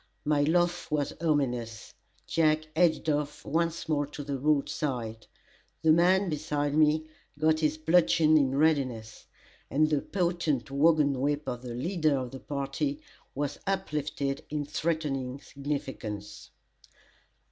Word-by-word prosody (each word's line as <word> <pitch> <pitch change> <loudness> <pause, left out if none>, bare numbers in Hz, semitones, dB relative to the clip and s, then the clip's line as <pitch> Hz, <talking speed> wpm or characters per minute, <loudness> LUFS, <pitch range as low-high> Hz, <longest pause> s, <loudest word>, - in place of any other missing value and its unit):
My 150 -1 +2
laugh 175 +3 +1
was 145 -2 -1
ominous, 125 -8 -1 0.3
Jake 155 -1 +1
edged 165 -1 +2
off 150 -1 -1
once 170 +2 -1
more 145 -2 0
to 145 0 -7
the 140 -1 -3
roadside; 135 -6 -1 0.6
the 160 - +6
man 185 +4 +4
beside 150 -2 -1
me, 155 +1 +3 0.3
got 155 +1 +2
his 155 -1 +1
bludgeon 160 -1 +4
in 135 -3 +3
readiness, 130 -8 0 0.4
and 155 +3 +2
the 145 -2 +2
potent 170 -8 -1
wagon 145 -2 +3
whip 145 +1 0
of 125 -1 -3
the 120 -2 -6
leader 155 +1 +1
of 130 -2 -4
the 135 - -8
party 150 - -3 0.4
was 145 0 -3
uplifted 150 -7 -2
in 150 -1 -2
threatening 145 -4 -2
significance. 135 -8 -6
150 Hz, 125 wpm, -29 LUFS, 135-160 Hz, 0.6 s, the